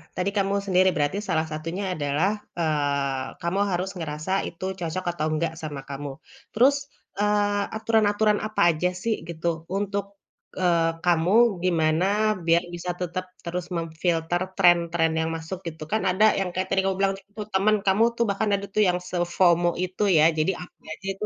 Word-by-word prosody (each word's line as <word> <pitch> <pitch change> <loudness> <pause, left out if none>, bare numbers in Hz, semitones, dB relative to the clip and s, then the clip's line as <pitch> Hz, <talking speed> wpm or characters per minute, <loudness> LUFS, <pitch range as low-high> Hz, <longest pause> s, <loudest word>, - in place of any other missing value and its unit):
tadi 180 +2 0
kamu 195 0 +1
sendiri 185 -1 +4
berarti 145 +6 0
salah 160 -2 +1
satunya 165 +5 -4
adalah, 150 +6 +1 0.3
eee, 140 -4 0
kamu 170 +3 -1
harus 180 +2 -1
ngerasa 155 +1 -4 0.2
itu 170 +2 -8
cocok 175 +2 -3
atau 155 -3 -3
enggak 160 +1 -1
sama 150 -3 -5
kamu. 140 0 -5 0.4
Terus, 260 +6 +5 0.4
eee, 205 0 +2
aturan-aturan 215 -1 +2
apa 215 - -2
aja 170 +2 +1
sih, 230 -1 +1
gitu, 165 0 -3
untuk, 200 0 -2 0.5
eee, 170 -3 +2
kamu 185 +5 +4
gimana, 165 -1 +2 0.4
biar 170 +1 +4
bisa 175 +1 -3
tetap 180 +1 -3 0.2
terus 175 +1 -3
memfilter 165 +1 -1 0.2
tren-tren 170 -2 +4
yang 160 0 0
masuk, 165 +3 -6
gitu. 160 -1 -6
Kan 220 - +1
ada 190 +4 +4
yang 190 -2 -1
kayak 185 +1 -2
tadi 190 - +3
kamu 195 0 +1
bilang, 195 0 +2 0.2
tuh 210 -1 -5
temen 200 +3 +3
kamu 195 +3 +4
tuh 235 - +2
bahkan 205 +2 0
ada 200 0 -4
tuh 215 - +5
yang 180 0 +1
se-FOMO 175 -1 +2
itu 185 +3 -2
ya, 155 - +6
jadi 155 +4 +2
apa 180 - -12 0.2
aja 190 - -10
itu 195 +2 -5
175 Hz, 165 wpm, -25 LUFS, 160-195 Hz, 0.5 s, ya